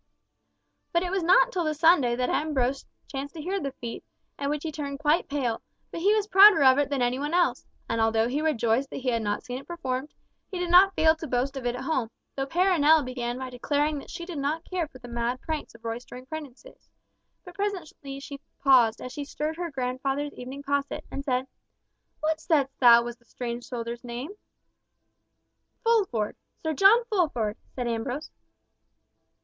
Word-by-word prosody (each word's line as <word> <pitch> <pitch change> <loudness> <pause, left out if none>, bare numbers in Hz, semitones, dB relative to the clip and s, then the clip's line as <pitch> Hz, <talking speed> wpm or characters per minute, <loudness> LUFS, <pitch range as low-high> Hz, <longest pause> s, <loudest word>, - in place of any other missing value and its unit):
But 340 +1 +2
it 360 - -3
was 385 -1 0
not - - +5
till 360 -5 -1
the 310 -1 -1
Sunday 295 -6 +4
that 250 0 0
Ambrose 275 -3 0 0.2
chanced 280 +2 -6
to 315 - -6
hear 380 +4 -1
of - - -3
the 275 - -2
feat, 235 -3 -7 0.4
at 280 0 -1
which 295 0 -2
he 320 - -3
turned 280 -2 -5
quite 305 +4 +1
pale, 255 -6 -1 0.3
but 335 - -5
he 400 +4 +4
was 425 -2 +1
prouder 400 -5 +8
of 260 +1 +6
it 285 -1 +1
than 275 -3 0
any 245 +2 0
one 295 +4 -1
else, 355 -1 +1 0.2
and 230 - 0
although 225 0 +2
he 275 +5 -1
rejoiced 265 -4 +1
that - - -8
he 260 -1 -1
had 230 -2 0
not 205 -1 -2
seen 250 0 -5
it 275 - -15
performed, 275 -5 -4 0.3
he 375 - -5
did 355 -1 -2
not 380 +2 +7
fail 315 0 +5
to 320 - -6
boast 255 +2 -1
of 260 -2 -3
it 240 - -1
at 250 - -6
home, 265 -6 -1 0.3
though 270 0 -2
Perronel 320 -2 +4
began 245 -1 -3
by 260 0 -6
declaring 290 +4 0
that - - -12
she 345 -1 -6
did 345 -5 -5
not 305 +4 -2
care 360 -3 -2
for 275 - -14
the 245 -1 -12
mad 235 +1 -2
pranks 310 -5 -5
of 230 - -16
roistering 245 +2 -6
prentices; 310 - -10 0.6
but 360 - -10
presently 345 -9 -4
she 280 0 -9 0.2
paused, 245 -5 +4
as 255 - -7
she 290 - -4
stirred 300 +2 -3
her 350 -1 -3
grandfather's 270 +2 -2
evening 265 +3 -8
posset, 280 0 -2
and 275 - -4
said, 255 -2 0 0.8
"What 315 +1 0
saidst 285 -4 +1
thou 235 -2 +8
was 240 0 -6
the 235 - -30
strange 240 0 -5
soldier's 235 -1 -5
name?" 245 +7 -6 1.5
"Fulford—Sir 325 - -1
John 415 - +6
Fulford" 305 - 0 0.2
said 245 -2 -2
Ambrose. 245 +5 -3
280 Hz, 195 wpm, -27 LUFS, 245-320 Hz, 1.5 s, prouder